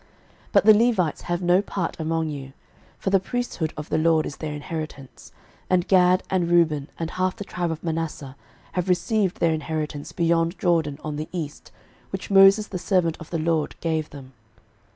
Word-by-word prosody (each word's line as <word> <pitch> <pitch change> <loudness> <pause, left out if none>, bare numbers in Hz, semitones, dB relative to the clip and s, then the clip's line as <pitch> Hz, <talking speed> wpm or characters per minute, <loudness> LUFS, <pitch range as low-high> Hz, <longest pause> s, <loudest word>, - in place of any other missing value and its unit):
06:018:007 - - -31 0.4
But - - +5
the 215 - +9
Levites 210 -8 +2
have 175 +1 -2
no 175 +2 +4
part 190 -5 -4
among 160 0 -1
you; 135 -2 -7 0.4
for 190 - -2
the 195 - +5
priesthood 195 -7 -3
of 150 0 -6
the - - +1
LORD 160 -1 +3
is 140 - -6
their 150 -2 -4
inheritance: 150 -3 -7 0.4
and 180 -1 +2
Gad, 185 -1 +4
and 180 -3 0
Reuben, 160 -4 +2
and 165 0 -4
half 185 0 -1
the 205 - -6
tribe 175 -3 -3
of 160 -1 -5
Manasseh, 160 -5 -4 0.4
have 180 +2 -2
received 185 +2 +1
their 165 -1 +3
inheritance 155 -2 -4
beyond 170 +1 +1
Jordan 165 -5 +1
on 150 -1 -4
the 155 +1 -5
east, 155 -5 -6 0.4
which 195 +1 -6
Moses 195 +2 +7
the 185 -3 -5
servant 175 -3 +1
of 160 - -10
the 170 - -2
LORD 160 -1 0
gave 160 -2 -1
them. 135 -2 -12
165 Hz, 185 wpm, -24 LUFS, 155-185 Hz, 0.4 s, the